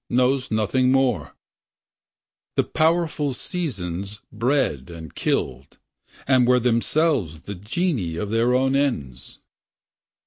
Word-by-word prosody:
Knows 130 +1 +2
nothing 120 +4 +2
more. 130 -4 +1 1.2
The - - +3
powerful 160 -3 +1
seasons 105 - -4
bred 115 - 0
and 80 -3 -9
killed. 65 +1 -2 0.5
And 130 -2 +4
were 125 0 +5
themselves 120 - +1
the 100 - -7
genii 105 - -2
Of 100 +4 -3
their 115 +2 +2
own 130 +1 +2
ends. 70 - -2
125 Hz, 105 wpm, -23 LUFS, 95-135 Hz, 1.2 s, were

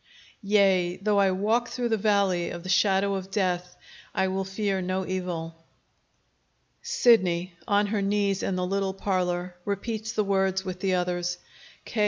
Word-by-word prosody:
"Yea, 195 -4 +3
though 205 +1 +1
I 195 -1 +4
walk 215 +6 +1
through 245 -1 -2
the 225 - +2
valley 200 -4 +1
of 170 -1 -7
the 185 - -7
shadow 195 0 +3
of 190 -1 -4
death, 180 -3 -1 0.4
I 190 - +2
will 190 +1 -1
fear 195 0 -2
no 185 +1 -2
evil." 170 -3 -4 1.2
Sidney, 185 - +3
on 205 0 +3
her 205 0 -1
knees 200 -1 +1
in 195 - -1
the 180 0 -1
little 195 0 -1
parlor, 180 -2 -1
repeats 215 +2 -3
the 215 -2 0
words 190 -1 +1
with 185 -1 -5
the 190 -1 +1
others. 180 0 -1 0.5
K. 230 - -5
190 Hz, 160 wpm, -26 LUFS, 180-205 Hz, 1.2 s, I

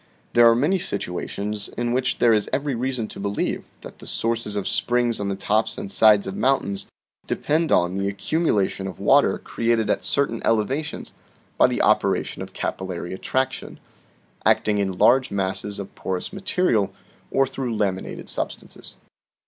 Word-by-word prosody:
" - - -37
There 120 0 +7
are 115 - +5
many 155 +10 +2
situations 100 - -3
in 120 0 0
which 125 0 0
there 120 -2 +5
is 105 -2 +1
every 140 0 0
reason 125 -2 -1
to - - -9
believe 100 +1 -2 0.2
that - - -11
the - - -11
sources 115 -2 -2
of 100 - -2
springs 120 -1 +1
on 100 -1 -2
the 100 - -1
tops 105 +3 0
and 95 - -6
sides 105 -2 +5
of 95 - -5
mountains 130 -7 0 0.4
depend 160 +2 0
on 90 +1 +3
the 100 +1 -1
accumulation 100 - 0
of 95 - -8
water - - +4
created 115 -1 0
at - - -1
certain 135 -5 0
elevations 130 +8 -1 0.4
by - - +5
the - - 0
operation - - +1
of - - -7
capillary 90 -1 -4
attraction, 130 +7 -2 0.6
acting 105 -1 +3
in 95 -2 -1
large 130 +5 +5
masses 100 +1 -2
of 100 -1 -7
porous 95 - -4
ma 195 - -6
terial, 120 - +2 0.4
or 135 - +3
through 130 -3 -4
laminated 95 -3 -2
substances. - - -5
110 Hz, 165 wpm, -23 LUFS, 100-130 Hz, 0.6 s, There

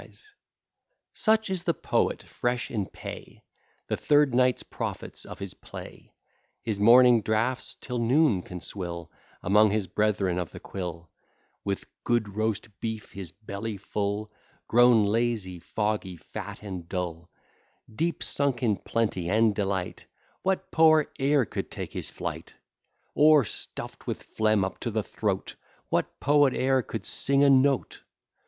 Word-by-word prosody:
Such 220 -2 +2
is 180 -2 -2
the 170 - +2
poet - - 0
fresh 120 +1 -2
in 105 -5 -1
pay, - - -9 0.4
The - - -1
third 145 -3 +3
night's 125 0 +3
profits - - -6
of - - -9
his 100 -2 -6
play; - - -11 0.5
His 110 -3 -2
morning 120 +2 +7
draughts 110 +5 -1
till 125 -2 -4
noon 120 - +3
can 90 0 -8
swill, 85 -3 -5 0.3
Among 105 +3 +5
his 105 -1 0
brethren 95 -1 0
of 90 - -3
the - - -10
quill: 85 -4 -6 0.5
With 100 -1 -2 0.2
good 120 -3 +1
roast 110 0 -1
beef 110 -1 -4
his 95 -5 -7
belly 100 +2 -6
full, 105 +1 -3 0.4
Grown 120 -2 +6
lazy, 105 -4 0
foggy, 105 -1 -2
fat, 85 - -8
and 90 -4 -7
dull, 85 -2 -4 0.6
Deep 165 +8 -1
sunk 140 -4 0
in 105 -4 +2
plenty 95 -7 -1
and 110 +2 +4
delight, 95 -3 -2 0.4
What 190 0 -1
poet 155 -2 +5
e'er 140 -1 +3
could - - -5
take - - -6
his - - -3
flight? - - -6 0.6
Or, 150 -3 +6
stuff'd - - -7
with - - -4
phlegm 110 -3 +1
up 95 - -6
to 120 - -3
the 110 -1 -1
throat, 100 -3 -3 0.3
What - - -1
poet 145 -2 +4
e'er 130 0 +2
could - - -6
sing 140 +1 +3
a 140 - +6
note? 135 0 +2
110 Hz, 145 wpm, -27 LUFS, 100-130 Hz, 0.6 s, morning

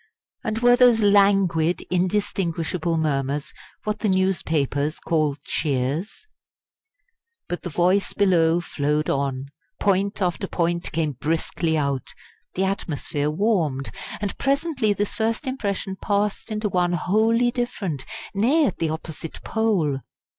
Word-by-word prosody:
And 220 0 -2
were 245 0 +7
those 245 -3 +5
languid, 195 -5 +4
indistinguishable 175 -3 0
murmurs 145 -2 -1 0.3
what 210 0 -2
the 215 - 0
newspapers 155 -6 +1
call 155 -3 0
"cheers"? 145 - -2 1.2
But 175 - -4
the 175 - -5
voice 180 +5 +2
below 175 -4 +3
flowed 150 -1 -1
on; 135 -1 -2 0.3
point 200 0 +1
after 185 0 -1
point 170 0 -1
came 155 -1 0
briskly 160 +3 -1
out; 140 -3 -2 0.4
the 190 - +1
atmosphere 150 -6 -2
warmed; 155 -7 0 0.3
and 205 -2 -3
presently 275 -5 +1
this 205 0 -1
first 225 +5 -1
impression 200 -7 -2
passed 205 +2 -1
into 215 0 -1
one 180 -2 +1
wholly 225 +7 +2
different 200 - -3 0.3
nay, 260 +11 +3
at - - -2
the 165 - 0
opposite 160 0 -6
pole. 190 -12 +1
180 Hz, 120 wpm, -23 LUFS, 155-210 Hz, 1.2 s, were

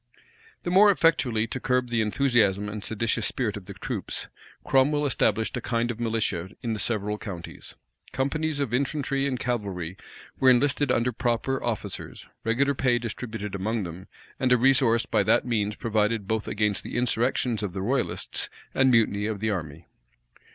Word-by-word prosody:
The 175 - -2
more 200 +3 +7
effectually 135 - +3
to 115 +4 -5
curb 125 -1 0
the 115 -2 +2
enthusiastic 105 -2 +2
and 105 0 -5
seditious 115 0 0
spirit 115 -5 -1
of 100 -3 -8
the - - -9
troops, - - -4 0.3
Cromwell 145 +2 +3
established 115 -4 +1
a - - -3
kind 120 0 0
of 115 - -8
militia 110 -6 -1
in 115 -2 -1
the 110 - -4
several 105 -1 -1
counties. 90 -6 -8 0.4
Companies 145 +3 -1
of 135 -5 -1
infantry 135 +1 0
and 130 -3 -2
cavalry 95 -8 -3 0.4
were 130 - +6
enlisted 140 +2 +3
under 120 +1 +2
proper 120 +3 -1
officers, 115 -3 -4 0.2
regular 135 +5 +2
pay 130 -2 +2
distributed 110 -3 -5
among 105 +3 -1
them, 90 +2 -8 0.3
and 130 -1 +1
a 125 - +6
resource 120 -2 +4
by 110 -3 +2
that 105 +5 +3
means 105 -4 0
provided 110 -2 0
both 110 0 -1
against 105 -1 0
the - - -5
insurrections 120 -1 +1
of 100 -4 -3
the 95 -1 -3
royalists 130 +6 -1 0.2
and 130 0 +4
mutiny 105 -4 +3
of 110 -2 -3
the 110 +1 0
army. 80 -4 -5
115 Hz, 165 wpm, -26 LUFS, 105-130 Hz, 0.4 s, more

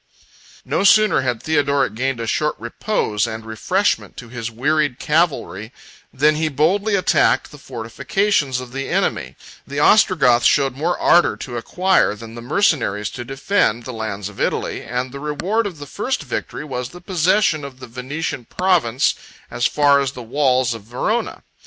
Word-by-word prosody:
No - - 0
sooner 215 -5 +5
had 125 -3 -2
Theodoric 140 -3 +1
gained 130 +2 -2
a 115 - -3
short 150 +6 0
repose 115 - -1
and 110 0 -6
refreshment 180 - -1
to 120 - -9
his 120 -1 -5
wearied 145 +3 0
cavalry, 150 - 0 0.4
than 150 +3 +3
he 160 0 0
boldly 195 +9 +1
attacked 185 - +2
the 150 - -12
fortifications 135 - -1
of 125 -1 -8
the 135 +1 -4
enemy; - - -1 0.3
the 140 +1 -4
Ostrogoths 140 - +5
showed 135 -3 +2
more 160 +5 -1
ardor 175 - +4
to 120 - -7
acquire, 180 - +1
than 115 +1 -10
the 120 - -8
mercenaries 120 - +1
to 120 - -6
defend, 135 - 0
the 130 - -6
lands 105 -3 -4
of 105 - -9
Italy; - - -1
and 125 +1 -3
the 140 - -8
reward 180 +10 -1
of 180 -5 -8
the 145 - -8
first 245 - -3
victory - - -5
was 125 -3 -4
the 175 - -12
possession 180 -2 +1
of 135 -2 -9
the - - -8
Venetian 130 +2 -5
province 160 -10 +1 0.4
as 120 - +1
far 145 -1 +4
as 140 -1 -1
the 125 - -8
walls 130 0 +1
of 115 - -8
Verona. 125 - -2
135 Hz, 165 wpm, -20 LUFS, 120-165 Hz, 0.4 s, sooner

